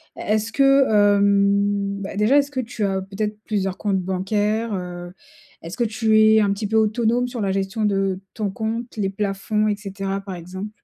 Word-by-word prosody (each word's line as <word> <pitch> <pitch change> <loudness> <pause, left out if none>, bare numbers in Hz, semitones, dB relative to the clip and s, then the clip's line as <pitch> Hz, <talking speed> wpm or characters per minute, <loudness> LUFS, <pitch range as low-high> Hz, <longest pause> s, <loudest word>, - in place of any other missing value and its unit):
est-ce 215 +1 -1
que, 275 +1 +4
hem 200 -1 +2
beh 200 0 -6
déjà 225 +7 +4
est-ce 285 0 +2
que 265 - -3
tu 235 -3 -4
as 190 -1 -1
peut-être 210 +2 -4
plusieurs 195 -3 -2
comptes 195 -3 0
bancaires? 205 +4 -1
Heu 175 -1 -6 0.5
est-ce 170 +6 -7
que 240 - +1
tu 220 -1 +2
es 220 0 +6
un 200 -1 +2
petit 205 +1 -4
peu 220 - -2
autonome 230 +3 +1
sur 245 -2 -5
la 195 -1 0
gestion 195 +3 -1
de 195 -2 0 0.2
ton 210 -2 -2
compte, 230 +3 -4
les 200 -2 0
plafonds 205 +2 -1
et 210 - +1
cetera 195 -1 -4
par 195 -2 -7
exemple? 185 +4 -7
205 Hz, 190 wpm, -22 LUFS, 195-220 Hz, 0.5 s, es